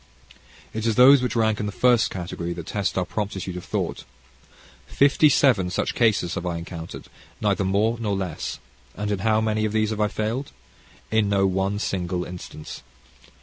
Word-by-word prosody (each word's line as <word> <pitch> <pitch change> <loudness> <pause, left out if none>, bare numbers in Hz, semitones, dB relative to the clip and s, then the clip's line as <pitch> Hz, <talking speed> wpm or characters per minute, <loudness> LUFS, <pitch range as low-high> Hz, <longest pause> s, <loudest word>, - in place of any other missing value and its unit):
It 110 +1 -2
is 110 - +1
those 130 +3 +8
which 125 -2 -2
rank 110 -2 +2
in 105 - -2
the - - -3
first 120 +2 +3
category 85 -1 -4
that 85 -1 -7
test 100 0 -2
our 90 - +1
promptitude 95 -2 -4
of 90 - -6
thought. - - -3 0.8
Fifty 145 +2 +4
seven 120 -10 +3
such 90 - -1
cases 105 -7 +2
have - - -3
I 85 -2 -2
encountered, 85 0 -8 0.3
neither 100 -2 +1
more 105 +5 +1
nor 105 -3 -1
less. 95 -5 -4 0.4
And 105 +1 -3
in 100 - -1
how 110 +2 +2
many 110 0 0
of 110 -1 -1
these 110 0 +1
have 105 -1 -2
I 105 - +3
failed? 110 +6 -3 0.6
In 110 -2 +2
no 100 -1 +3
one 95 +2 0
single 90 -3 -2
instance. 90 -3 -9
105 Hz, 180 wpm, -24 LUFS, 90-110 Hz, 0.8 s, those